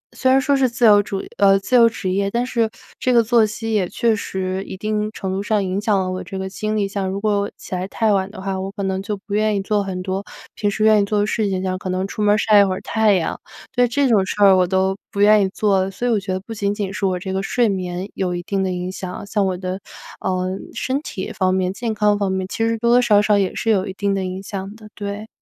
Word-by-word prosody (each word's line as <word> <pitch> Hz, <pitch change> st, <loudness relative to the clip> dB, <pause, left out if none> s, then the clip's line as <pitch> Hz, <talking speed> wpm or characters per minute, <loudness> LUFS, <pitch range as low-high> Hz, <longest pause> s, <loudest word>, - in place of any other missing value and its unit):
虽 260 Hz, 0 st, +2 dB
然 265 Hz, -, +5 dB
说 280 Hz, +1 st, +2 dB
是， 265 Hz, -2 st, +2 dB
自 240 Hz, 0 st, +1 dB
由 205 Hz, -1 st, +7 dB
主 195 Hz, -1 st, -4 dB, 0.2 s
呃， 195 Hz, -1 st, +6 dB
自 200 Hz, +6 st, -1 dB
由 235 Hz, -1 st, +7 dB
职 190 Hz, -4 st, -4 dB
业， 200 Hz, +1 st, 0 dB
但 240 Hz, +3 st, -1 dB
是 230 Hz, -3 st, 0 dB, 0.3 s
这 255 Hz, -, +1 dB
个 235 Hz, -1 st, +5 dB
作 230 Hz, 0 st, +4 dB
息 225 Hz, +1 st, -4 dB
也 190 Hz, -4 st, +1 dB
确 230 Hz, -2 st, +1 dB
实 190 Hz, -1 st, -3 dB
一 190 Hz, -, -8 dB
定 215 Hz, +1 st, -1 dB
程 190 Hz, -2 st, -4 dB
度 190 Hz, -, -2 dB
上 210 Hz, -1 st, 0 dB
影 190 Hz, +2 st, -2 dB
响 210 Hz, -2 st, +2 dB
了 185 Hz, -1 st, -1 dB
我 185 Hz, 0 st, -4 dB
这 190 Hz, +2 st, -7 dB
个 190 Hz, -, -3 dB
精 215 Hz, +2 st, -3 dB
力。 200 Hz, -1 st, +1 dB
像 195 Hz, -1 st, -3 dB
如 195 Hz, -, -3 dB
果 205 Hz, -1 st, 0 dB
起 -, -, -10 dB
来 185 Hz, +1 st, -2 dB
太 220 Hz, 0 st, +1 dB
晚 190 Hz, 0 st, 0 dB
的 205 Hz, -, -11 dB
话， 190 Hz, 0 st, -3 dB
我 195 Hz, +1 st, -4 dB
可 200 Hz, -2 st, -5 dB
能 190 Hz, 0 st, -1 dB
就 205 Hz, +1 st, -4 dB
不 200 Hz, +1 st, -9 dB
愿 215 Hz, 0 st, +2 dB
意 195 Hz, -, 0 dB
做 205 Hz, -1 st, 0 dB
很 185 Hz, -2 st, -4 dB
多 190 Hz, +1 st, -3 dB, 0.3 s
平 205 Hz, -, -1 dB
时 215 Hz, +1 st, -1 dB
愿 215 Hz, -1 st, +5 dB
意 -, -, +1 dB
做 210 Hz, 0 st, 0 dB
的 205 Hz, -, +2 dB
事 210 Hz, -1 st, 0 dB
情， 190 Hz, -1 st, -2 dB
像 185 Hz, 0 st, -2 dB
可 185 Hz, -, -5 dB
能 185 Hz, +1 st, -1 dB
出 210 Hz, -, -5 dB
门 205 Hz, 0 st, +4 dB
儿 -, -, +1 dB
晒 215 Hz, -1 st, +5 dB
一 -, -, +7 dB
会 190 Hz, -1 st, 0 dB
儿 -, -, -7 dB
太 220 Hz, -2 st, +2 dB
阳。 165 Hz, -3 st, -2 dB, 0.4 s
对， 245 Hz, -1 st, +4 dB
这 275 Hz, +3 st, +1 dB
种 210 Hz, -5 st, +4 dB
事 190 Hz, -, -4 dB
儿 195 Hz, -1 st, +7 dB
我 180 Hz, -1 st, +3 dB
都 190 Hz, +1 st, +1 dB, 0.2 s
不 200 Hz, -, -5 dB
愿 210 Hz, +1 st, +6 dB
意 190 Hz, -, +1 dB
做。 195 Hz, -2 st, +1 dB
所 240 Hz, +6 st, -3 dB
以 -, -, +2 dB
我 215 Hz, -, +2 dB
觉 195 Hz, -1 st, -5 dB
得 185 Hz, -, -1 dB
不 225 Hz, -, -8 dB
仅 205 Hz, -1 st, -1 dB
仅 195 Hz, -2 st, -3 dB
是 195 Hz, -, 0 dB
我 185 Hz, -1 st, 0 dB
这 190 Hz, +1 st, -5 dB
个 190 Hz, -, 0 dB
睡 235 Hz, +4 st, +1 dB
眠 185 Hz, -1 st, -3 dB
有 180 Hz, -2 st, -2 dB
一 175 Hz, -, -4 dB
定 195 Hz, 0 st, -1 dB
的 185 Hz, -, -1 dB
影 180 Hz, 0 st, -3 dB
响， 185 Hz, 0 st, -6 dB
像 205 Hz, 0 st, 0 dB
我 185 Hz, -1 st, -2 dB
的， 185 Hz, +1 st, -4 dB, 0.4 s
呃， 185 Hz, -1 st, -1 dB, 0.3 s
身 270 Hz, +3 st, -1 dB
体 220 Hz, -4 st, -6 dB
方 185 Hz, -3 st, +1 dB
面、 185 Hz, 0 st, 0 dB
健 230 Hz, +2 st, -3 dB
康 210 Hz, -1 st, +2 dB
方 195 Hz, -2 st, 0 dB
面， 190 Hz, 0 st, -1 dB
其 -, -, -6 dB
实 230 Hz, 0 st, +1 dB
多 235 Hz, +1 st, +1 dB
多 245 Hz, +1 st, +6 dB
少 210 Hz, -4 st, +4 dB
少 210 Hz, 0 st, +3 dB
也 190 Hz, -, -1 dB
是 225 Hz, -, 0 dB
有 195 Hz, -1 st, +1 dB
一 190 Hz, -, -5 dB
定 200 Hz, 0 st, -1 dB
的 195 Hz, -1 st, -1 dB
影 185 Hz, +1 st, -5 dB
响 195 Hz, +1 st, -6 dB
的， 215 Hz, -1 st, -13 dB
对。 205 Hz, +1 st, -6 dB
200 Hz, 310 characters per minute, -20 LUFS, 190-215 Hz, 0.4 s, 由